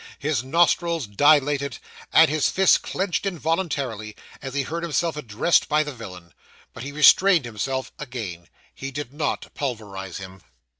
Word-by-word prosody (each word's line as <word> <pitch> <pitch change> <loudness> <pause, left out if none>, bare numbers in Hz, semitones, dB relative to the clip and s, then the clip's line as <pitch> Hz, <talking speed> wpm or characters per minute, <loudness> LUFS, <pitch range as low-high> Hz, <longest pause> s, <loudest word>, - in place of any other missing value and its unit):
His 145 -4 -1
nostrils 170 +1 +2
dilated, 140 +3 +2 0.3
and - - +7
his 150 0 +1
fists 190 -1 +4
clenched 190 -2 -2
involuntarily, 145 - -2 0.3
as 135 -1 -7
he 140 - +1
heard 165 +5 -4
himself 170 0 -1
addressed 150 +3 +1
by 155 0 +3
the 150 -1 -6
villain. 90 - -11 0.4
But - - -9
he 135 +3 -6
restrained 165 +2 +5
himself 130 +4 -3
again 110 -11 -6 0.3
he 135 - -6
did 140 -1 -6
not 150 0 -3
pulverise 105 - -5
him. 95 -1 -10
140 Hz, 145 wpm, -23 LUFS, 115-155 Hz, 0.4 s, and